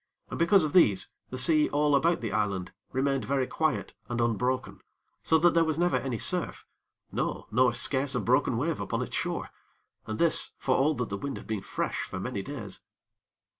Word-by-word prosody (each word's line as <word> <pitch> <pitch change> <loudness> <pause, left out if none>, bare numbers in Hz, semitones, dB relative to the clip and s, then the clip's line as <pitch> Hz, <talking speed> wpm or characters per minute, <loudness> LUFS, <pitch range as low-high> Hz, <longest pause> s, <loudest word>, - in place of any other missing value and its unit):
And, - - -5
because 170 +2 +5
of 150 - -2
these, 105 - +4 0.2
the 130 - -5
sea 150 +4 +4
all 145 0 +2
about 165 +5 +2
the 115 - -3
island 100 -4 -1 0.2
remained 135 0 0
very 135 -1 0
quiet 155 +3 -1 0.2
and 120 0 -2
unbroken, 120 +2 -1 0.4
so 160 - +3
that 175 +2 +4
there 165 - +4
was 160 -2 -1
never 175 +1 +2
any 130 -4 -3
surf, - - -1 0.5
no, - - -2
nor 125 +2 +4
scarce 135 +2 0
a - - +1
broken 125 0 +2
wave 160 +5 -1
upon - - -2
its - - -6
shore, - - -3 0.6
and 110 - -3
this, 170 -1 +3
for 130 - 0
all 150 +3 +2
that 125 -3 -3
the 100 - -3
wind 140 +6 -5
had - - -10
been 110 -3 -3
fresh - - -3
for - - -5
many 95 +1 -3
days. 105 -5 -7
130 Hz, 195 wpm, -28 LUFS, 115-155 Hz, 0.6 s, because